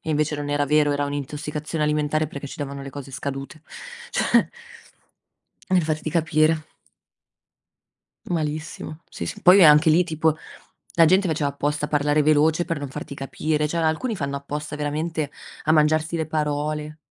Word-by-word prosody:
e 160 Hz, -, -5 dB
invece 150 Hz, 0 st, 0 dB
non 145 Hz, 0 st, -4 dB
era 145 Hz, 0 st, +1 dB
vero, 150 Hz, 0 st, +3 dB
era 145 Hz, 0 st, 0 dB
un'intossicazione 150 Hz, +2 st, -4 dB
alimentare 150 Hz, 0 st, +1 dB
perché 140 Hz, -2 st, -7 dB
ci -, -, -10 dB
davano 140 Hz, -1 st, -5 dB
le 135 Hz, -, -7 dB
cose 140 Hz, 0 st, -8 dB
scadute. 135 Hz, +3 st, -6 dB, 0.5 s
Cioè, -, -, +3 dB, 1.2 s
per 185 Hz, -2 st, +3 dB
farti 155 Hz, 0 st, -2 dB
capire. 155 Hz, -1 st, +2 dB, 1.7 s
Malissimo. 155 Hz, -1 st, -4 dB
Sì, -, -, -6 dB
sì. -, -, -6 dB
Poi, 185 Hz, +1 st, +8 dB
anche 150 Hz, +1 st, +7 dB
lì, 165 Hz, +3 st, +5 dB
tipo 160 Hz, -2 st, 0 dB, 0.6 s
la 165 Hz, -, +6 dB
gente 185 Hz, +3 st, +4 dB
faceva 150 Hz, -3 st, 0 dB
apposta 145 Hz, +1 st, -2 dB
parlare 145 Hz, 0 st, +2 dB
veloce 155 Hz, +3 st, +3 dB
per 165 Hz, -3 st, -3 dB
non 145 Hz, -1 st, -5 dB
farti 140 Hz, +1 st, -7 dB
capire, 150 Hz, +2 st, -1 dB
cioè 170 Hz, -, -3 dB
alcuni 165 Hz, +9 st, 0 dB
fanno 140 Hz, -4 st, -3 dB
apposta 150 Hz, +2 st, -5 dB
veramente 150 Hz, +1 st, -2 dB, 0.3 s
a 155 Hz, -, +3 dB
mangiarsi 155 Hz, +1 st, +2 dB
le 160 Hz, -1 st, -2 dB
parole. 150 Hz, 0 st, -2 dB
150 Hz, 155 wpm, -23 LUFS, 145-160 Hz, 1.7 s, Poi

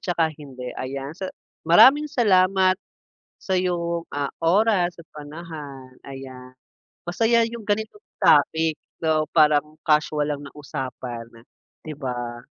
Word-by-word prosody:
saka 165 Hz, -3 st, 0 dB
hindi, 130 Hz, -4 st, -9 dB
ayan. 135 Hz, +2 st, -5 dB
Sa 190 Hz, +2 st, -6 dB, 0.4 s
maraming 275 Hz, -, +7 dB
salamat 190 Hz, -6 st, +3 dB, 0.6 s
sa 190 Hz, -, -2 dB
iyong, 170 Hz, -2 st, -1 dB
ah, 145 Hz, -1 st, -2 dB
oras 185 Hz, 0 st, +3 dB
at 165 Hz, -, -13 dB
panahon. 145 Hz, -4 st, -9 dB
Ayan, 130 Hz, -2 st, -10 dB, 0.5 s
masaya 230 Hz, +6 st, +2 dB
yung 230 Hz, 0 st, -6 dB
ganitong 220 Hz, -, -2 dB, 0.2 s
topic, 160 Hz, 0 st, +4 dB, 0.3 s
so 155 Hz, -1 st, +1 dB
parang 150 Hz, -1 st, +3 dB
casual 150 Hz, -1 st, +2 dB
lang 145 Hz, -1 st, -3 dB
na 140 Hz, -, -10 dB
usapan, 130 Hz, -5 st, -6 dB, 0.6 s
'di 155 Hz, -, -6 dB
ba? 120 Hz, -2 st, -5 dB
155 Hz, 120 wpm, -23 LUFS, 140-185 Hz, 0.6 s, maraming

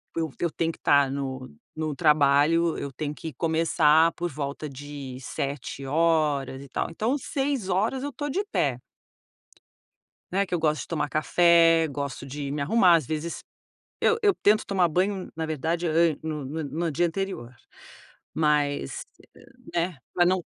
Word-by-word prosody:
eu 165 Hz, -2 st, -1 dB, 0.2 s
tenho 165 Hz, 0 st, -1 dB
que -, -, -15 dB
tá 145 Hz, -2 st, +4 dB
no 130 Hz, -2 st, -4 dB, 0.3 s
no 155 Hz, -2 st, -3 dB
trabalho, 150 Hz, +2 st, +3 dB
eu 140 Hz, -, -5 dB
tenho 150 Hz, +3 st, -4 dB
que 160 Hz, -3 st, -7 dB
começar 160 Hz, +1 st, +3 dB
por 175 Hz, 0 st, -4 dB
volta 145 Hz, 0 st, -5 dB
de 140 Hz, -1 st, -8 dB
07:00, 140 Hz, +1 st, -1 dB
e 140 Hz, -, -11 dB
tal. -, -, -2 dB
Então, 230 Hz, -, 0 dB
06:00 260 Hz, -4 st, -1 dB
eu 285 Hz, -, -3 dB
tô 290 Hz, +3 st, -4 dB
de 390 Hz, +9 st, -1 dB
pé. 130 Hz, -4 st, 0 dB, 1.5 s
Né, 200 Hz, +1 st, +2 dB
que 180 Hz, -, -4 dB
eu -, -, +1 dB
gosto 155 Hz, -1 st, +1 dB
de -, -, -12 dB
tomar 150 Hz, -3 st, -1 dB
café, 165 Hz, +1 st, +4 dB
gosto 140 Hz, 0 st, -5 dB
de 140 Hz, +1 st, -5 dB
me 145 Hz, +1 st, -3 dB
arrumar 180 Hz, +3 st, +5 dB
às 155 Hz, -7 st, -2 dB
vezes 160 Hz, +2 st, -4 dB, 0.6 s
eu 460 Hz, -, +3 dB
eu 410 Hz, -1 st, +5 dB
tento 210 Hz, +1 st, +4 dB
tomar 185 Hz, -3 st, +2 dB
banho 185 Hz, +3 st, -1 dB
na 160 Hz, 0 st, -2 dB
verdade 165 Hz, +3 st, -2 dB
eu 155 Hz, -, -1 dB, 0.3 s
no 155 Hz, -3 st, -4 dB
no 155 Hz, +3 st, -4 dB
no 160 Hz, +4 st, -2 dB
dia 175 Hz, +4 st, +1 dB
anterior. 165 Hz, -10 st, -5 dB, 0.8 s
Mas, 145 Hz, -, 0 dB, 0.7 s
né, 170 Hz, -1 st, 0 dB, 0.2 s
pra 175 Hz, -, +3 dB
não 180 Hz, -1 st, +2 dB
160 Hz, 155 wpm, -26 LUFS, 145-175 Hz, 1.5 s, arrumar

